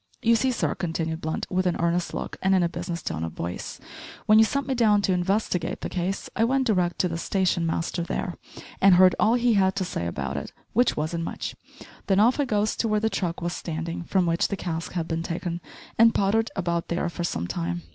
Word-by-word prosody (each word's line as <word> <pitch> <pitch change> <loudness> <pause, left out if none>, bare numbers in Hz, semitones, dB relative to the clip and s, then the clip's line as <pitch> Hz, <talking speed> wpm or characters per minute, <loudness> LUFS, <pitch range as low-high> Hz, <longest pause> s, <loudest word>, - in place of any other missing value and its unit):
You 230 0 +5
see, 260 +4 +2
sir," 245 - 0
continued 165 -1 -3
Blunt, 160 0 -2
with 185 0 +1
an 175 - +1
earnest 170 +1 0
look, - - -5
and 190 0 +3
in 185 - +3
a 170 - +1
business 175 0 -5
tone 80 - -3
of 80 -1 -4
voice, 85 +1 -5 0.5
"when 215 0 +6
you 220 - +7
sent 280 +4 -1
me 270 - -1
down 215 -4 +3
to 190 - +2
investigate 180 -1 -1
the - - -3
case 185 +2 -2
I 225 - +2
went 265 +3 +2
d'rect 180 -6 +1
to 180 - +1
the 165 -1 -4
station 180 -1 +1
master 165 +2 -1
there 175 +1 -3 0.5
and 195 -2 +7
heard 185 0 +7
all 225 +2 +4
he 240 -1 +3
had 190 -2 +3
to 195 -1 -1
say 85 - -3
about 70 -4 -3
it 70 - -6 0.2
which 245 +3 +3
wasn't 165 +2 -2
much; - - -5 0.5
then 195 -1 +3
off 240 +7 +4
I 285 - +3
goes 210 -3 0
to 230 - 0
where 215 -1 +2
the 220 +1 0
truck 170 -2 -2
was 175 0 -1
standin', 165 0 -4
from 185 0 +2
which 170 0 +1
the 200 - -3
cask 165 -3 -4
had 170 -2 -2
bin 165 0 -2
taken 170 +1 -4 0.4
and 230 0 +6
pottered 220 +3 +2
about 170 -2 -1
there 170 +1 -1
for 175 0 -4
some 85 - -2
time. 85 0 -3
180 Hz, 230 wpm, -25 LUFS, 170-210 Hz, 0.5 s, you